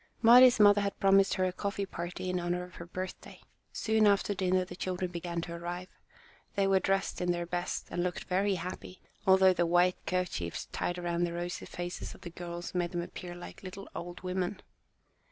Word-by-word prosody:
Mari's 245 +1 +8
mother 205 0 +7
had 200 0 -2
promised 195 0 +5
her 185 - +1
a 185 - -1
coffee 200 +1 -2
party 175 0 -5
in 180 - 0
honour 175 +1 -1
of 180 0 -11
her 170 - -8
birthday. 185 +1 -7 0.3
Soon 220 -1 +2
after 205 0 +3
dinner 185 -1 +1
the 180 - -9
children 180 0 -3
began 170 0 -3
to 170 0 -6
arrive. 175 +2 -5 0.7
They 200 - +2
were 195 0 +4
dressed 195 0 0
in 180 0 +2
their 175 0 -2
best 175 +1 -3
and 175 - -1
looked 180 0 -2
very 195 +2 +1
happy, 180 +1 -6 0.3
although 190 0 +7
the 175 -1 +1
white 175 +1 +3
kerchiefs 180 - -2
tied 175 - -2
around 175 0 0
the 170 - -4
rosy 175 +1 -4
faces 175 0 -5
of - - -17
the 175 - -8
girls 175 0 -6
made 175 0 -1
them 175 - -1
appear 175 0 -8
like 175 - -10
little 195 +1 -8
old 175 +1 -6
women. 185 +1 -2
180 Hz, 195 wpm, -31 LUFS, 175-190 Hz, 0.7 s, Mari's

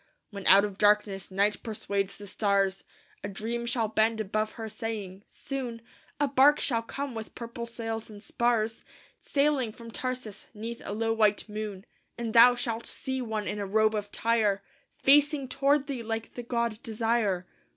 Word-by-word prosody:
When 200 -2 -5
out 200 +2 +8
of 205 -1 -7
darkness 205 -2 +3
night 200 +2 +1
persuades 200 -3 -3
the 205 - -9
stars, 195 -1 +1 0.4
A 200 - -3
dream 230 +4 -3
shall 235 -2 +1
bend 220 +1 +2
above 215 +1 -1
her 225 -2 -6
saying, 215 -4 -5
"Soon 255 -4 -5 0.4
A 290 - +3
barque 280 +2 +5
shall 230 -4 +1
come 275 +3 -5
with 220 -1 -7
purple 235 0 -6
sails 225 -1 -4
and 205 -1 -11
spars, 230 -2 0 0.4
Sailing 280 -5 +1
from 230 +1 -11
Tarsus 250 -5 -5
'neath 230 +2 -6
a - - -4
low 225 +1 0
white 215 -2 +2
moon; 210 -2 -5 0.3
And 230 -2 -3
thou 240 +1 +8
shalt 230 -2 -3
see 265 0 -4
one 220 -3 -3
in 210 - -2
a 200 - -3
robe 215 +2 +3
of 205 -1 -3
Tyre 215 -4 +1 0.3
Facing 290 0 +4
toward 275 +2 +2
thee 270 -4 -4
like 225 0 -4
the 245 - -5
god 235 -2 -2
Desire. 220 -5 0
225 Hz, 170 wpm, -28 LUFS, 210-240 Hz, 0.4 s, out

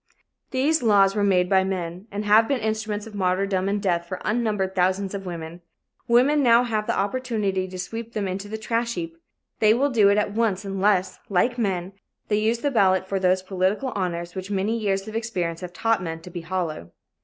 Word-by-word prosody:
These 285 +4 +1
laws 200 -3 +4
were 205 - +1
made 185 -3 +3
by 190 0 +4
men 185 0 -4
and 205 +1 -4
have 215 +2 +5
been 275 -2 0
instruments 215 -1 -2
of 225 - -11
martyrdom 190 0 0
and 205 +1 0
death 175 -4 0
for 185 - -5
unnumbered 210 -4 0
thousands 190 +2 0
of 195 -1 -5
women. 170 0 -7 0.5
Women 260 +5 +4
now 240 -2 +5
have 215 -3 -2
the - - 0
opportunity 205 -3 -1
to 185 0 -8
sweep 225 +5 -6
them 205 -2 -2
into 190 +2 -4
the 220 +1 -5
trash 230 +2 -1
heap. 165 -2 -5 0.4
They 215 0 +5
will 280 +3 +1
do 215 -5 +5
it 200 - +3
at 210 -1 +1
once 210 -3 0
unless, 195 -1 +1
like 235 +6 +1
men, 190 -3 -1 0.4
they 210 -1 +2
use 225 +2 0
the 285 - 0
ballot 190 -6 +3
for 195 0 -1
those 185 0 +2
political 190 +7 0
honors 175 -2 -3
which 190 0 -6
many 205 +3 0
years 195 -3 -1
of 215 - -7
experience 185 -8 -2
have 180 -1 -6
taught 225 +3 0
men 165 -2 -4
to 180 - -11
be 175 - -5
hollow. 165 - -4
200 Hz, 205 wpm, -24 LUFS, 185-220 Hz, 0.5 s, have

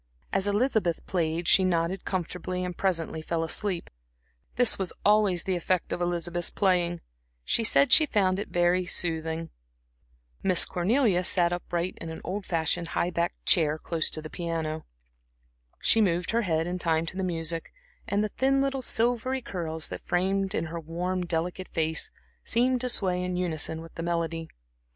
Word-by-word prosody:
As 195 +1 +1
Elizabeth 205 -5 +1
played 165 -1 -1
she 190 - +6
nodded 175 +1 0
comfortably 180 0 -3
and 180 -1 -5
presently 165 -4 -1
fell 165 +1 -1
asleep. 180 +2 -2 0.6
This 245 -4 +4
was 190 -2 0
always 205 -4 +4
the 190 - 0
effect 180 0 0
of - - -3
Elizabeth's 175 0 -1
playing; 175 -3 +1 0.4
she 230 - +2
said 250 +4 +4
she 310 +3 +7
found 190 -6 +2
it 205 - -3
very 175 +1 +2
soothing. 165 -1 -1 0.9
Miss 185 -2 +4
Cornelia 195 0 +2
sat 175 -1 +2
upright 175 0 -3
in 165 - -5
an 160 - -6
old 195 +2 -4
fashioned, 165 0 0
high 175 +1 -1
backed 170 +1 -2
chair 155 -3 +4
close 160 0 -1
to 155 - -1
the 155 - -7
piano. 160 -2 -3 1.0
She 225 - +5
moved 175 -3 +1
her 230 +1 +2
head 165 -6 0
in 180 +1 -3
time 165 -1 +1
to 165 - -6
the 190 - -2
music, 165 -2 -2 0.4
and 205 +1 +1
the 215 - -1
thin 270 +5 +1
little 275 -1 0
silvery 245 +2 0
curls 160 -5 -2
that - - -6
framed 195 +2 +1
in 165 - 0
her 165 +1 -5
worn, 175 +3 -3
delicate 175 +3 -2
face 160 -1 0 0.3
seemed 250 +1 +2
to 250 - +1
sway 180 -5 +1
in 180 0 -2
unison 160 -2 0
with 165 0 -12
the - - -6
melody. 165 -1 -2
175 Hz, 170 wpm, -27 LUFS, 165-195 Hz, 1.0 s, she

